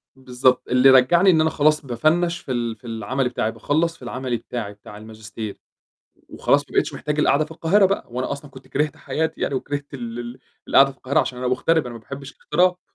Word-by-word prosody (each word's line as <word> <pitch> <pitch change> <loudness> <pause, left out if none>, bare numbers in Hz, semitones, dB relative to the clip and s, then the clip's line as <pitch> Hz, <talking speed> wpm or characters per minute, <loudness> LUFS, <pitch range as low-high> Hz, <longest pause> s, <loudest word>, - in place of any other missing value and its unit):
بالضبط، 130 -1 +1
اللي 125 +2 +5
رجّعني 135 +9 +6
إن 160 -4 +5
أنا 160 - +3
خلاص 155 -1 +2
بافنّش 165 +8 +1
في - - -8
ال 120 -2 -2
في 125 - -14
العملي 120 +4 -2
بتاعي، 115 -2 -1
باخلّص 155 +9 0
في - - -32
العملي 125 0 -3
بتاعي 110 -3 -6
بتاع 105 0 -13
الماجستير، 110 -1 -8 0.7
وخلاص - - +2
ما - - -16
بقيتش - - +1
محتاج 150 0 -3
القعدة 150 0 +3
في 150 - -16
القاهرة 170 +5 +3
بقى، 195 +1 -1
وأنا 125 +1 -3
أصلًا 140 0 -8
كنت 130 -1 -14
كرهت 150 +3 -1
حياتي 160 0 -3
يعني، - - -1
وكرهت 145 +2 -4
ال 120 -3 -6
ال 120 +1 -7 0.3
القعدة 135 0 +6
في 135 - -15
القاهرة، 135 +1 +1
عشان 125 - -4
أنا 125 0 -2
مُغترب، 150 +4 +1
أنا 120 - -7
ما 115 - -9
باحبش 140 +3 -9
الاغتراب. 180 0 +1
130 Hz, 210 wpm, -22 LUFS, 120-155 Hz, 0.7 s, رجّعني